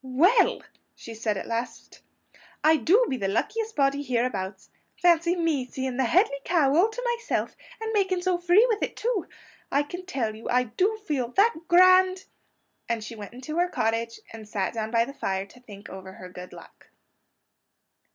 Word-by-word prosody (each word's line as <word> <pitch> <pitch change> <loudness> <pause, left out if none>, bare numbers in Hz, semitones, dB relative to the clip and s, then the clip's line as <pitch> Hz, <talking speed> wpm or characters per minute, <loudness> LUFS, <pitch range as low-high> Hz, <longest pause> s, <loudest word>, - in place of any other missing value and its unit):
"WELL!" 300 - +3 0.3
she 230 - -10
said 220 -2 -2
at - - -5
last, 230 +2 -5 0.6
"I 315 +1 +6
do 400 +10 +4
be 260 - -2
the 200 -4 -2
luckiest 435 - -2
body 280 0 +2
hereabouts! 230 -8 -3 0.3
Fancy 345 0 +3
me 325 -6 0
seeing 260 0 -5
the 265 - +2
Hedley 280 - +2
Kow 295 -5 +2
all 370 +7 +4
to 480 +1 -2
myself, - - -2 0.2
and 445 0 -4
making 380 -3 +1
so 365 -1 +1
free 355 +6 +5
with 445 -3 -1
it - - -2
too! 455 -6 -1 0.4
I 285 - +2
can 355 +5 -8
tell 230 -10 -2
you, 220 - -8
I 250 +1 +3
do 370 - 0
feel 270 -8 -1
that 445 +4 +4
GRAND 370 +1 +5 0.3
" - - -32
And 230 -2 -1
she 230 +2 -8
went 210 0 -9
into 285 +7 -5
her 355 +1 +2
cottage, 230 -3 -1
and 220 -2 -10
sat 200 -3 -2
down 220 -1 -3
by 230 0 +2
the 275 - -9
fire 190 -7 -2
to 225 +5 -18
think 210 -4 -12
over 190 0 -10
her 185 -1 -11
good 180 0 -10
luck. - - -15
275 Hz, 185 wpm, -26 LUFS, 230-370 Hz, 0.6 s, I